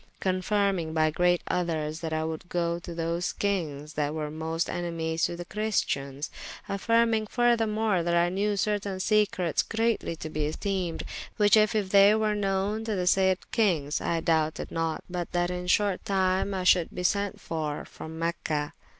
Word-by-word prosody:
Confyrmyng 185 -3 0
by 155 -1 +3
great 175 +2 +2
othes, 160 -3 -1
that 165 -1 -4
I 155 0 0
would 160 +2 -5
goe 170 -1 0
to 170 -1 -8
those 170 +1 -1
kinges 155 -7 -2
that 150 0 -1
were 150 -1 -3
most 160 +2 -2
enemies 165 -2 -1
to 175 - -3
the 175 0 -7
Christians: 145 -10 -2 0.4
affyrmyng 225 +1 +2
furthermore, 225 -5 +2
that 170 +1 0
I 170 0 +3
knewe 205 +2 0
certain 200 -2 -1
secretes 195 -4 +2
greatly 225 -6 -1
to 155 - -6
be 150 -1 -1
esteemed, 180 +1 -2 0.3
which 205 -1 +5
if 215 0 +4 0.2
they 200 +2 +7
were 215 -1 +1
knowen 200 +1 -1
to 220 -2 -1
the 180 -1 -1
sayde 190 0 +4 0.2
kynges, 165 -10 +1
I 165 -1 0
doubted 160 -1 0
not 165 -1 -2
but 175 -2 -4
that 175 0 +1
in 180 0 -4
shorte 200 0 +2
tyme 190 0 +1
I 185 - -2
should 180 -2 +4
bee 180 - -5
sent 200 +2 0
for 155 -3 -4
from 160 0 -9
Mecha. 160 -3 -2
180 Hz, 165 wpm, -27 LUFS, 160-200 Hz, 0.4 s, they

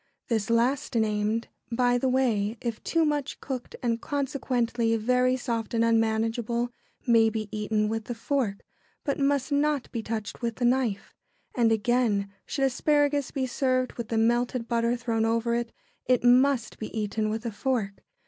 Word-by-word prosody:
] - - -56
This 220 -3 0
last 240 +3 +1
named, 215 0 0 0.2
by 245 +1 +2
the 260 - +1
way, 235 -4 +1
if 235 -2 -4
too 330 -1 +2
much 295 -2 -1
cooked, 260 -3 -5
and 230 -1 0
consequently 245 -5 0
very 250 +3 +2
soft 235 -2 -3
and 230 0 +3
unmanageable, 230 +1 +1 0.3
may 230 -3 +5
be 215 -1 -3
eaten 210 0 0
with 220 0 -3
the 240 - -4
fork, 230 -4 -2 0.4
but 280 - -1
must 280 0 +1
not 285 -1 +1
be 230 - -3
touched 220 0 -5
with 235 -1 -2
the 245 - -1
knife. 240 -5 0 0.4
And 235 -2 +3
again, 220 -3 +1
should 275 - 0
asparagus 290 +1 +2
be 265 -2 -2
served 255 0 0
with 235 -2 -5
the 225 - -1
melted 240 +1 +1
butter 235 0 +1
thrown 230 -2 -1
over 230 +1 +1
it, 235 0 -1 0.4
it 250 -2 +3
must 250 -1 +3
be 215 - -4
eaten 215 +1 -1
with 220 +2 -3
a 230 - -2
fork. 210 -3 -2
235 Hz, 165 wpm, -27 LUFS, 225-255 Hz, 0.4 s, may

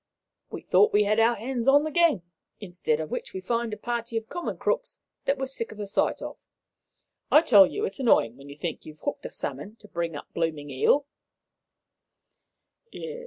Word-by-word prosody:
We - - -7
thought 425 - +4
we 210 - +5
had 215 +2 +2
our 230 +1 +4
hands 240 +2 -3
on 285 +2 +6
the 310 - -3
gang, 325 - +3 0.4
instead 175 -6 -2
of 155 -1 -5
which - - -4
we 190 - -4
find 230 +4 -1
a 210 - -4
party 235 -1 -3
of 225 0 -4
common 350 -1 -4
crooks - - -2 0.3
that 275 - +1
we're 265 - -2
sick 260 -3 -5
of 215 - -11
the 210 - -4
sight 200 - 0
of. - - -7 0.9
I 305 - +7
tell 205 - +8
you, 415 - -4
sir, - - +3
it's 450 - -6
annoying 125 - +3
when 140 +2 -13
you 140 - -10
think 165 +1 -4
you've 155 0 -12
hooked 285 +12 -3
a - - -10
salmon, 215 - -6
to 215 - -16
bring 170 -4 -3
up 145 - -8
a - - -48
blooming 155 -4 -2
eel." 270 - +3
220 Hz, 205 wpm, -26 LUFS, 170-270 Hz, 0.9 s, tell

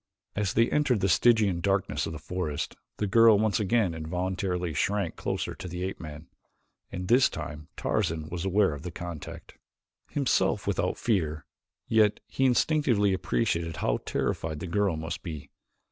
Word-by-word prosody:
As 105 -3 0
they 115 +1 +4
entered 145 -7 +2
the 95 - +3
Stygian 105 -1 +4
darkness 95 0 0
of - - -4
the - - -5
forest 80 -2 -3 0.2
the 105 - 0
girl 115 +1 +6
once 110 -2 +1
again 105 -3 +2
involuntarily 90 +2 -2
shrank 100 +1 0
closer - - -3
to 95 - -8
the 90 +1 -5
ape 95 +1 -4
man, 75 -1 -8 0.7
and 90 0 -5
this 125 +5 +5
time 75 0 -7
Tarzan 80 -6 -1
was 85 +1 -4
aware 95 -2 +3
of 70 - -7
the 90 - -5
contact. 85 -2 -8 0.5
Himself 140 -3 +1
without - - 0
fear, 80 -9 0 0.4
he 110 - -1
yet 105 -2 +4 0.2
instinctively 125 -5 +3
appreciated 80 0 -1
how - - 0
terrified 80 -2 -2
the 85 - -5
girl 95 -1 +1
must 80 +2 -4
be. 80 -5 -7
90 Hz, 160 wpm, -28 LUFS, 80-105 Hz, 0.7 s, girl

